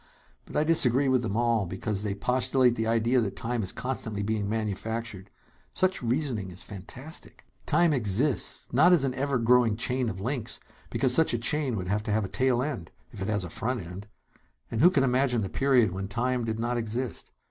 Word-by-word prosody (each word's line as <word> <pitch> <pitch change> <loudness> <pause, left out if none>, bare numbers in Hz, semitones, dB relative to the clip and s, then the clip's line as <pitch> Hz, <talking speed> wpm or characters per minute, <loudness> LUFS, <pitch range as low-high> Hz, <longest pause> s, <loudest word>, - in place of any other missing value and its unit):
But - - -6
I 150 - +3
disagree 140 -4 +4
with 130 -2 +3
them 110 -3 -2
all, 115 -4 +1
because 100 +3 -3
they 105 -2 -2
postulate 125 +3 +2
the 110 -1 -1
idea 115 +2 +2
that 100 -4 -3
time 120 0 -2
is 95 - -1
constantly 110 -5 -3
being 105 -1 -1
manufactured. 110 -1 -4 0.4
Such 185 0 +1
reasoning 120 -5 -1
is 90 0 -4
fantastic! 125 - -9 0.2
"Time 165 +1 +3
exists. 120 +1 +1
Not 175 +8 +6
as 165 -6 +4
an 135 -2 0
ever 140 0 -1
growing 115 -2 +3
chain 125 0 0
of 95 - -6
links, 120 +3 -2 0.3
because 130 -2 +2
such 160 -3 +4
a - - 0
chain 130 +2 0
would 90 -3 -4
have 105 +3 0
to 105 0 -4
have 105 0 +1
a - - -7
tail 130 -1 +1
end, 135 - -4 0.2
if 105 - -10
it 95 - -2
has 105 -2 +1
a 90 - -6
front 125 0 -2
end; 90 +5 -9 0.6
and 115 - -1
who 175 - +8
can 145 -7 +2
imagine 125 -3 +2
the 95 - -4
period 130 -7 +3
when 95 +1 -4
time 125 +2 -1
did 110 -1 -2
not 120 +2 -1
exist? 115 +2 -4
120 Hz, 200 wpm, -27 LUFS, 105-130 Hz, 0.6 s, who